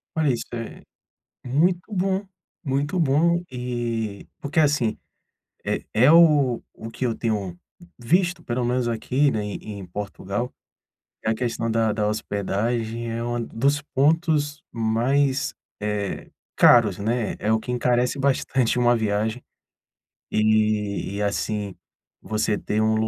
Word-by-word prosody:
Olha 155 -4 +2
isso 115 - -3
é, 115 -1 -6 0.6
muito 175 - +1
bom, 190 +1 0 0.4
muito 145 +5 -1
bom, 165 +4 +3
e 120 -4 -3
porque 150 +3 0
assim, 145 -7 +2 0.7
é - - -1
é 125 +6 +5
o 150 -8 +5
o 115 - -8
que 125 +2 -2
eu 115 - 0
tenho 105 -7 -2 0.4
visto 175 +9 +1
pelo 120 0 -2
menos 125 0 0
aqui, 130 +5 +1
né, 105 -4 -2
em 105 -1 -6
Portugal, 100 +4 -4 0.7
é 110 - +2
a - - +2
questão 115 -1 -2
da 110 -1 +2
da 105 0 0
hospedagem, 110 +3 -2
é 115 +1 -3
um 120 0 -2
dos 140 +6 0
pontos 150 0 +2
mais, 130 +5 +1 0.3
eh, 105 -1 -3 0.3
caros, 110 -6 +6
né. 110 +2 -1
É 110 - 0
o 110 - +2
que 125 - -6
encarece 125 +2 +1
bastante 130 -3 +1
uma 120 0 +4
viagem, 110 +1 -1 0.9
e 105 -2 +1
e 105 - -2
assim, 105 -1 -2 0.5
você 110 -1 -1
ter 105 +1 -1
um 110 0 +3
120 Hz, 135 wpm, -24 LUFS, 110-140 Hz, 0.9 s, caros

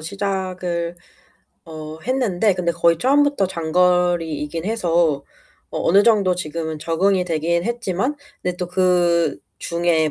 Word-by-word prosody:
시작을 185 -2 -3 0.7
어 155 -1 -8
했는데 220 -4 +1
근데 175 -1 -1
거의 170 0 +2
처음부터 285 -2 +3
장거리이긴 170 -2 0
해서 175 -7 +1 0.6
어 - - -4
어느 195 +4 +6
정도 205 -5 +3
지금은 160 -2 -4
적응이 180 +4 +1
되긴 170 +1 0
했지만 235 +2 -1 0.3
근데 180 -1 -2
또 180 -1 -4
그중에 170 -2 +1
175 Hz, 260 characters per minute, -21 LUFS, 165-195 Hz, 0.7 s, 어느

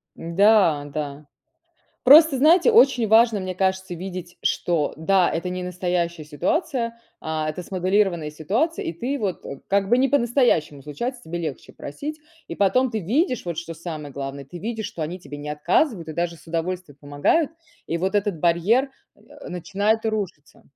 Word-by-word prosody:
Да-да. 155 -6 +1 0.8
Просто, 300 +2 +8
знаете, 335 - +5
очень 270 - +5
важно, 220 -1 +5
мне 185 -1 -5
кажется, 190 -1 -1
видеть, 180 0 -7
что 165 -4 0
да, 180 +3 +3
это 170 +2 -2
не 180 0 -4
настоящая 175 -2 -2
ситуация, 235 - -2 0.2
а, 155 -1 -2
это 175 +3 -7
смоделированная 185 -3 0
ситуация. 215 - -1
И - - -3
ты 250 - -3
вот, 200 -6 -3
э, 140 - -7
как 195 0 +1
бы 240 +3 +4
не 270 - +3
по-настоящему 240 - +1
случается, 240 - -5
тебе 170 +2 -5
легче 155 -5 -6
просить. 300 - -7 0.3
И - - -6
потом 235 +6 +2
ты 220 - -1
видишь, 250 - 0
вот 170 -3 -4
что 165 -1 -5
самое 155 -4 -7
главное, 140 0 -6
ты 140 +6 -11
видишь, 220 +1 -4
что 205 -7 -6
они 170 +4 -4
тебе 145 -4 -9
не 145 +1 -7
отказывают 170 - 0
и 155 - -4
даже 170 +1 -2
с 155 - -20
удовольствием 170 -1 -4
помогают. 145 - +1 0.4
И 170 - -1
вот 190 +3 -1
этот 205 -4 0
барьер, 175 - +2 0.3
э, - - -25 0.3
начинает 205 +5 -1
рушиться. 200 -9 -4
185 Hz, 165 wpm, -23 LUFS, 160-225 Hz, 0.8 s, Просто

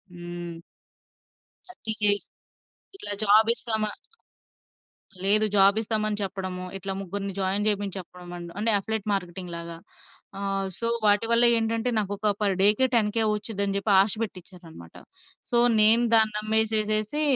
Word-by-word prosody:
హ్మ్. 175 -1 -8 1.1
30,000 220 - +1 0.8
ఇట్లా 395 - -3
జాబ్ 215 +2 +4
ఇస్తామా 220 -3 -1 1.3
లేదు 215 +2 +5
జాబ్ 195 +1 +4
ఇస్తామని 215 -1 -2
చెప్పడము. 185 -1 -5
ఇట్లా 195 0 -5
ముగ్గురిని 195 +1 -5
జాయిన్ 195 +2 -1
చేయమని 205 -2 -1
చెప్పడం 180 0 -12 0.3
అంటే 225 +2 +1
అఫిలియేట్ 220 +1 -5
మార్కెటింగ్‌లాగా 175 -2 -6 0.6
ఆహ్, 195 -1 -3
సో, 230 - -3 0.2
వాటివల్ల 230 +3 +3
ఏంటంటే, 225 +1 -1
నాకు 205 -2 -2
ఒక 210 +1 -1
పర్ 200 -2 0
డే 200 - +6
కే 260 - +3
10,000 225 0 +2
వచ్చుద్ది 210 -1 -3
అని 195 0 -2
జెప్పి 200 +1 -2
ఆశ 200 - -2
పెట్టచ్చారన్నమాట. 175 - -10 0.6
సో, 240 - 0 0.2
నేను 225 +3 +7
దాన్ని 220 -1 +4
నమ్మేసేసేసి 215 +4 +1
205 Hz, 125 wpm, -24 LUFS, 190-220 Hz, 1.3 s, నేను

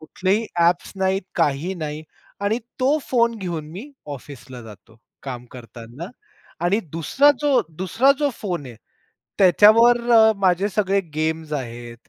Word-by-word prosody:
कुठलेही 190 +7 -1 0.2
ॲप्स 170 +1 +1
नाहीत, 190 +1 0
काही 150 +7 0
नाही 155 -3 -6 0.4
आणि 205 +3 0 0.2
तो 275 +4 +2
फोन 235 -2 +2
घेऊन 165 -5 -5
मी 220 - -9 0.2
ऑफिसला 130 -2 -11
जातो, 110 +1 -15 0.3
काम 125 -3 -7
करतांना. 120 +4 -10 0.6
आणि 195 +5 +2
दुसरा 215 - +3
जो, 285 -4 +3
दूसरा 190 - +1
जो 290 -1 +1
फोन 175 -9 -4
आहे 120 - -11 0.6
त्याच्यावर 215 +5 +6
अ, 220 -1 +6
माझे 190 +1 +2
सगळे 200 -1 0
गेम्स 160 0 -2
आहेत 120 -3 -7
175 Hz, 135 wpm, -21 LUFS, 145-215 Hz, 0.6 s, त्याच्यावर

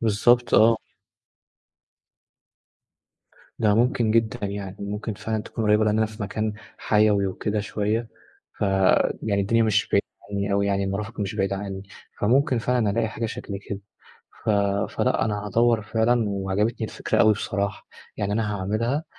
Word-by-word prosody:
بالضبط 120 +3 +3
آه. 115 +1 +6 2.8
ده 105 -2 +3
ممكن 120 -1 +2
جدًا 110 -2 +1
يعني، 100 -1 -6
ممكن 105 +2 -4
فعلًا 110 +1 -3
تكون 115 - -4
قريِّبة، 105 +1 +4
لأن 105 0 +2
أنا 110 - +3
في 110 0 -8
مكان 110 +2 -2 0.3
حيوي 105 -2 +3
وكده 105 +2 -2
شوية، 105 +2 -2 0.5
فيعني 100 +1 +2
الدنيا 115 +4 +2
مش 110 -1 +2
بعيدة 100 - +2 0.3
عني 100 0 -1
أوي 100 0 +2
يعني، 100 0 +1
المرافق 105 +3 -4
مش 100 +1 -2
بعيدة 100 -1 0
عني. 95 -1 -5 0.4
فممكن 125 +3 +3
فعلًا 120 -2 +1
ألاقي 110 +1 0
حاجة 115 +2 -3
شكل 100 -2 -6
كده. 100 -1 -4 0.6
ف 110 - +1 0.4
فلأ، - - +1
أنا 105 -1 -2
هادوِّر 115 +1 +2
فعلًا، 115 +2 +1
وعجبتني 100 +3 -1
الفكرة - - -2
أوي 110 - +6
بصراحة. 100 -1 -3 0.3
يعني 100 0 -1
أنا 105 -1 0
هاعملها، 115 - -1
105 Hz, 145 wpm, -24 LUFS, 100-115 Hz, 2.8 s, آه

